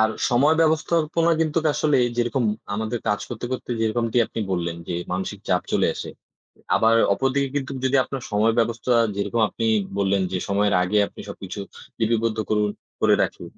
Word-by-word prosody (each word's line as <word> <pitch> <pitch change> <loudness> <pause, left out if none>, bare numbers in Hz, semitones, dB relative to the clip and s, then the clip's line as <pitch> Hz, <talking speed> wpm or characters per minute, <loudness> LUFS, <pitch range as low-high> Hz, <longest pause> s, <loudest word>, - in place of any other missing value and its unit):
আর 110 - +4 0.2
সময় 135 +6 +4
ব্যবস্থাপনা 165 +1 +2
কিন্তু 160 0 +1 0.2
আসলে, 150 -1 +2 0.2
যেরকম 120 +1 0 0.3
আমাদের 110 +3 -2
কাজ 105 -1 +1
করতে, 120 0 -5
করতে, 130 - -5
যেরকমটি 115 +1 0
আপনি - - -5
বললেন 85 -2 -2
যে, 90 - -2 0.2
মানসিক 95 +2 -3
চাপ 90 -2 +2
চলে - - +3
আসে। - - -6 0.7
আবার 115 0 +4 0.2
অপরদিকে 135 +5 0
কিন্তু 140 0 -2
যদি 130 +1 +3
আপনার 135 -2 -6
সময় 110 +2 +3
ব্যবস্থা, 115 +2 0 0.2
যেরকম 100 +3 -1
আপনি 115 - -3 0.3
বললেন 100 -1 +2
যে, 95 - 0
সময়ের 100 +1 +2
আগে 95 +4 +1
আপনি - - -13
সবকিছু 100 0 -7 0.4
লিপিবদ্ধ 115 0 +1
করুন, 105 -1 +2 0.3
করে - - +5
রাখি। - - -3
115 Hz, 165 wpm, -23 LUFS, 105-135 Hz, 0.7 s, করে